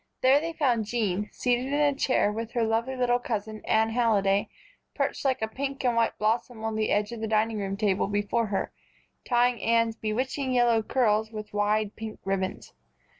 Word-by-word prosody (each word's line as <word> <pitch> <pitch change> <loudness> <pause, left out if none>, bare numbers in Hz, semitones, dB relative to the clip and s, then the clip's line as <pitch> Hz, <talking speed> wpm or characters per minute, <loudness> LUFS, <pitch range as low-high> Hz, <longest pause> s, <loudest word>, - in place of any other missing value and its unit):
There 265 +2 +5
they 330 +1 -4
found 250 -9 +1
Jean, 210 -3 -1
seated 245 +1 0
in 280 - -3
a 290 -1 +3
chair 255 -6 +1
with 225 +2 -5
her 240 -2 +1
lovely 225 +4 0
little 245 -1 +2
cousin 215 -3 -4
Anne 220 0 +2
Halliday 205 -4 +2 0.5
perched - - -1
like 260 -5 0
a - - +1
pink 275 +3 -4
and 245 -2 +2
white 230 0 +1
blossom 220 +1 -1
on 220 0 -1
the 215 0 0
edge 210 +1 +1
of 235 - -6
the 220 - -2
dining 215 -2 0
table 200 -3 +1
before 205 +3 0
her, 200 -1 -2 0.5
tying 245 -2 +2
Anne's 230 -1 +2
bewitching 255 +5 -2
yellow 240 -2 +3
curls 220 -2 +1
with 215 -2 -8
wide 210 0 0
pink 220 -1 -7
ribbons. 190 -1 -3
225 Hz, 180 wpm, -27 LUFS, 210-245 Hz, 0.5 s, There